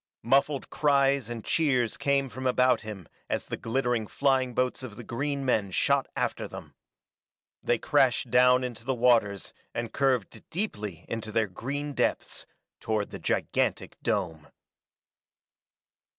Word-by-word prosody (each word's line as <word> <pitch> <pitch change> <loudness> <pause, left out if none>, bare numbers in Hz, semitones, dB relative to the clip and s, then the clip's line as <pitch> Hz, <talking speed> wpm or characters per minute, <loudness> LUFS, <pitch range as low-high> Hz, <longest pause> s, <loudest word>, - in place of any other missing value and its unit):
Muffled 135 +3 +2
cries 140 -4 +2
and 115 -2 -6
cheers 130 -8 +1
came 140 -1 +1
from 130 +2 -4
about 125 0 +3
him 105 -6 -8 0.2
as - - -1
the - - -4
glittering 120 -2 -1
flying 130 -2 +1
boats 125 0 0
of 125 -5 -7
the - - -9
green 140 +3 -2
men 110 -6 +1
shot 95 - +2
after - - -2
them. - - -10 0.9
They 120 - +1
crashed 135 -2 +2
down 125 +1 +5
into 120 -2 -5
the 130 +2 -1
waters 115 -5 +2 0.2
and 115 -1 -3
curved 125 -6 0
deeply 105 - -4
into 110 -1 -4
their 110 0 +2
green 140 +9 -4
depths, - - -1 0.3
toward 110 -2 -2
the - - -7
gigantic - - -1
dome. 80 -3 -2
125 Hz, 135 wpm, -28 LUFS, 110-135 Hz, 0.9 s, down